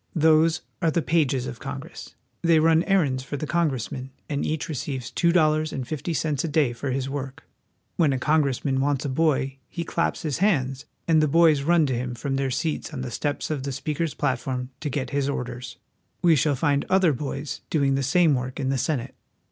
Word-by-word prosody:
Those 160 0 +4 0.2
are 165 - +3
the 160 +1 0
pages 140 -6 +1
of 120 - -6
Congress; - - -8 0.3
they 165 -1 +4
run 160 +1 +4
errands 150 -10 +2
for 145 +2 -5
the 155 - -3
congressmen; 135 -5 -1 0.2
and 145 -2 -2
each 155 +2 -2
receives 135 -5 -4
two 170 -1 +2
dollars 155 -2 +3
and 130 -3 -4
fifty 155 +2 -3
cents 150 -2 -1
a - - -1
day 145 -5 +2
for 135 +4 -4
his 130 0 -1
work. 135 -1 -5 0.5
When 155 -4 +4
a 135 - 0
congressman 140 -2 +1
wants 140 -1 0
a - - -1
boy 135 -2 +1
he 170 - -4
claps 170 0 -1
his 155 -1 -2
hands, 135 -9 +1 0.2
and 160 -2 +5
the 155 - +3
boys 160 -1 +5
run 165 +2 +3
to 135 - -1
him 125 0 -3
from 135 +4 -2
their 135 -1 0
seats 155 +5 -2
on 135 -4 -5
the 125 -1 -5
steps 145 +5 -2
of 150 -3 -2
the 140 +1 -3
Speaker's 150 +3 -2
platform 130 -1 -2
to 150 - -3
get 135 -1 -3
his 140 0 0
orders. 125 -2 -5 0.5
We 170 -2 +6
shall 145 0 +2
find 140 +1 +1
other 185 -4 +4
boys 140 +2 -5
doing 140 -3 +2
the 135 - +1
same 155 +4 +4
work 130 +1 -3
in 135 -2 -1
the 135 -1 0
Senate. 130 -3 -2
145 Hz, 205 wpm, -25 LUFS, 130-160 Hz, 0.5 s, We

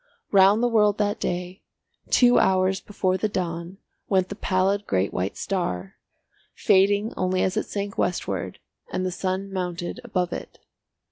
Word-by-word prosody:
Round 200 +3 +5
the - - +4
world 210 -3 +3
that 205 -1 0
day, 180 +2 -3 0.5
two 245 -1 +5
hours 190 0 +2
before 190 -2 -1
the 215 - 0
dawn, 175 -1 -4 0.3
went 190 -2 +2
the 200 - -5
pallid 195 +1 0
great 95 0 0
white 95 +2 -2
star, 95 - -3 0.6
fading 205 +2 +3
only 185 0 0
as 185 - 0
it 215 - -1
sank 200 0 -4
westward 180 - -2 0.3
and 185 - -1
the 185 - -1
sun 190 +2 -3
mounted 180 +2 -3
above 180 -7 -1
it. - - -7
190 Hz, 150 wpm, -24 LUFS, 180-205 Hz, 0.6 s, Round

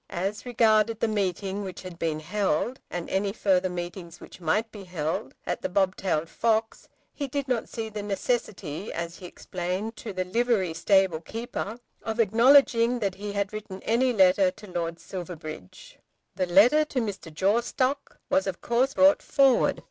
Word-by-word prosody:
As 195 +7 -3
regarded 225 -2 +3
the 230 - +1
meeting 200 -1 -1
which 190 -1 -7
had 180 -2 -9
been 155 -2 -1
held, 200 - -1
and 175 -1 -4
any 195 +1 0
further 190 -3 +1
meetings 175 -1 -6
which - - -13
might 215 +8 0
be 205 -2 -9
held, 155 -6 -3
at - - -2
The - - -2
Bobtailed 185 -4 0
Fox, 225 +4 -1 0.2
he 285 - -4
did 280 +1 -3
not 250 -3 -1
see 225 -1 -4
the 215 -1 -5
necessity, 200 - -3
as 170 +1 -5
he 180 - -9
explained 185 +6 -4
to 220 - -6
the 185 -1 -2
livery 205 -3 +1
stable 185 -1 +2
keeper, 225 +2 -5 0.2
of 225 +1 -4
acknowledging 235 +2 +5
that 200 -5 -1
he 205 +1 -6
had 200 0 -2
written 210 -3 -7
any 250 +3 +2
letter 190 -3 +5
to 195 - -12
Lord 170 -1 -3
Silverbridge. 160 - -8 0.4
The 185 - 0
letter 225 +13 +6
to 275 - -2
Mr. 200 -7 -4
Jawstock 235 - 0
was 285 -5 +1
of 185 -2 -3
course 250 +3 +1
brought 285 +1 +5
forward. 270 -2 +3
200 Hz, 165 wpm, -26 LUFS, 180-230 Hz, 0.4 s, letter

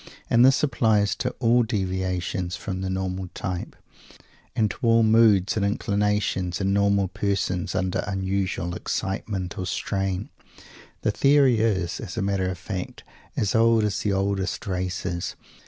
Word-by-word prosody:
And 120 +1 +6
this 135 +2 +5
applies 110 -7 +2
to 125 - -1
all 120 0 +4
deviations 95 -4 -2
from 95 -2 -5
the 95 - -2
normal 95 0 -3
type, 90 -2 -4 0.8
and 110 -2 +2
to - - -9
all 115 -2 +4
moods 110 -4 +4
and 105 - 0
inclinations 100 -3 0
in 100 0 +1
normal 100 -1 +3
persons 95 -1 -1
under 95 -1 0
unusual 95 -3 -2
excitement 95 +1 -3
or 90 - -3
strain. 95 +2 -2 0.7
The 110 - +1
theory 135 -1 +4
is, 95 -5 0
as - - -7
a 110 - 0
matter 95 -2 0
of 95 - -4
fact, 95 0 -6 0.3
as 100 - +1
old 115 0 +4
as 105 -2 0
the 105 - 0
oldest 95 -1 -1
races. 90 -2 -3
100 Hz, 145 wpm, -25 LUFS, 95-110 Hz, 0.8 s, And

